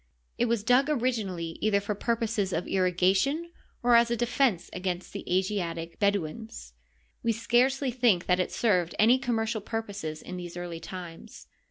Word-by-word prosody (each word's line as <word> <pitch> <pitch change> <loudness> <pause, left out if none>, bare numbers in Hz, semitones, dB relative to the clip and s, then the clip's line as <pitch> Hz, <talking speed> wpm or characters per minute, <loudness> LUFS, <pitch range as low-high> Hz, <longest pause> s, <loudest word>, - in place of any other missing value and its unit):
It 240 - +3
was 235 -3 0
dug 255 +5 +4
originally 215 - -1
either 210 -2 +3
for 200 +1 -3
purposes 220 -3 -1
of 170 - -2
irrigation 190 - +1 0.3
or 245 0 +4
as 235 0 +5
a 235 - 0
defense 240 -5 +1
against 180 -1 -4
the - - -5
Asiatic 175 -3 -1
Bedouins. 200 - -2 0.5
We 230 - +1
scarcely 250 +4 +2
think 235 -8 +2
that 180 0 +2
it 185 - 0
served 180 -7 +1
any 235 +4 +5
commercial 225 -3 -1
purposes 200 -8 -5
in 180 - -7
these 175 -1 -7
early 175 -1 -5
times. 175 -2 -9
205 Hz, 155 wpm, -28 LUFS, 180-235 Hz, 0.5 s, as